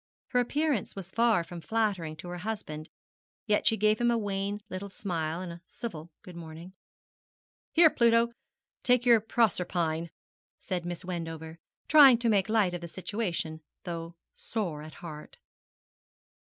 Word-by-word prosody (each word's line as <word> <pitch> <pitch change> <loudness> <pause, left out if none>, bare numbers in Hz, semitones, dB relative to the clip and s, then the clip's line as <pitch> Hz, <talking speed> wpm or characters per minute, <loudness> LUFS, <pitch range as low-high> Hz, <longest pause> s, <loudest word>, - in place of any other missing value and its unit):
Her 250 - +2
appearance 285 -1 0
was 190 -1 -7
far 230 -6 +3
from 170 0 -9
flattering 195 -6 -1
to 165 +3 -9
her 175 0 -5
husband, 175 -7 -5 0.6
yet 210 -2 +2
she 225 - +4
gave 215 +2 +3
him 240 - +4
a 235 - +3
wan 200 -1 -2
little 200 0 -6
smile 170 -4 -3
and 180 -2 -5
a 170 0 -10
civil 170 -9 -7
good 180 - -11
morning. 170 +2 -9 1.0
'Here, 325 -2 +7
Pluto, 235 -1 +4 0.5
take 250 -1 +3
your 235 -3 +6
Proserpine,' 175 -7 0 0.5
said 180 -3 -3
Miss 175 0 -5
Wendover, 165 -2 -5 0.3
trying 280 -5 +9
to 235 0 +1
make 200 -2 +2
light 210 -5 +3
of 175 - -4
the 170 - -6
situation, 175 -4 -3 0.2
though 170 -1 -5 0.2
sore 180 -10 -4
at 155 0 -10
heart. 155 -3 -9
185 Hz, 150 wpm, -29 LUFS, 170-225 Hz, 1.0 s, trying